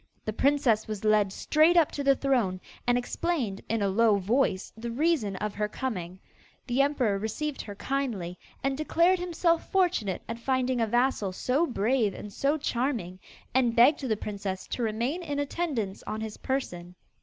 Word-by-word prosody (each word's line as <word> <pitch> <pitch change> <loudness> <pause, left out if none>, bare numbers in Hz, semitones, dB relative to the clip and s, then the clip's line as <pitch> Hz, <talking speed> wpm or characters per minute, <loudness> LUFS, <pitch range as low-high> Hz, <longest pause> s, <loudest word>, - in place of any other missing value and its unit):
The 215 - -2
princess 255 -4 +2
was 215 -1 -5
led 210 -2 +4
straight 315 - +3
up 325 -3 +5
to 285 - -4
the 275 0 +5
throne, 245 -10 +1 0.3
and 245 0 +4
explained, 245 - -2
in 225 -1 0
a - - +2
low 215 +2 +4
voice, 200 0 0
the 230 +2 -5
reason 255 - +1
of 210 +2 -3
her 210 0 -1
coming. 185 -8 -4 0.5
The 250 +1 +2
emperor 255 -8 +1
received 270 +8 -3
her 205 - -8
kindly, 210 -9 -3 0.2
and 270 0 +1
declared 335 +5 +2
himself 340 -1 0
fortunate 350 - +1
at 230 +1 -5
finding 255 0 0
a 225 - +2
vassal 240 -4 +1
so 270 - +1
brave 230 -3 +1
and 205 - -8
so 285 +7 +1
charming, 235 - -2 0.3
and 245 -2 +2
begged 250 +6 +6
the 235 -6 -1
princess 200 -2 -4
to - - -3
remain 235 +9 -1
in 290 -4 -4
attendance 285 - -2
on 215 - -3
his 220 -1 -5
person. 180 -10 -4
240 Hz, 170 wpm, -28 LUFS, 210-280 Hz, 0.5 s, begged